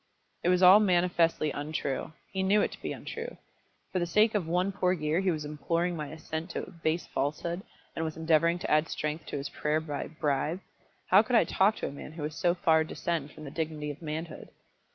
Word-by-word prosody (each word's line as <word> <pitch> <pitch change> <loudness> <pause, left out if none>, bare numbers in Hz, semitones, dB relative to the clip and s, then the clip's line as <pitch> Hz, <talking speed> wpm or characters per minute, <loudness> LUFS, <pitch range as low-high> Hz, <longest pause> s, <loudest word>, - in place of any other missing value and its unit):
It 175 - +1
was 180 0 +3
all 185 +3 +10
manifestly 175 -5 +2
untrue. 145 0 -3 0.2
He 190 - -1
knew 200 +2 +4
it - - -1
to - - -11
be - - -3
untrue. 470 +2 -6 0.5
For 185 - 0
the 175 - -1
sake 210 +6 +4
of 200 -6 0
one 180 +3 +1
poor 185 -2 +1
year 155 -1 0
he 190 -1 +1
was 155 -3 -1
imploring 170 +4 -1
my 150 -2 -4
assent 160 +2 -5
to - - -3
a - - -10
base 165 0 -1
falsehood, 160 +6 -2 0.3
and 160 - -2
was 160 -1 -4
endeavouring 165 +1 +3
to - - -4
add 155 +1 +4
strength 150 +1 -3
to - - -3
his 140 +1 -4
prayer 150 +1 0
by 150 -3 -4
a - - -10
bribe. 150 +2 -1 0.5
How - - +9
could 240 +3 -1
I 225 - +7
talk 200 +3 +3
to - - -3
a - - -5
man 140 +2 -9
who 160 -2 -6
would 150 +1 -3
so 175 +3 +1
far 160 -2 +4
descend 160 -2 -3
from 155 - -12
the 140 - -7
dignity 155 -2 -3
of 145 - -11
manhood? 160 +1 -5
165 Hz, 225 wpm, -29 LUFS, 150-180 Hz, 0.5 s, all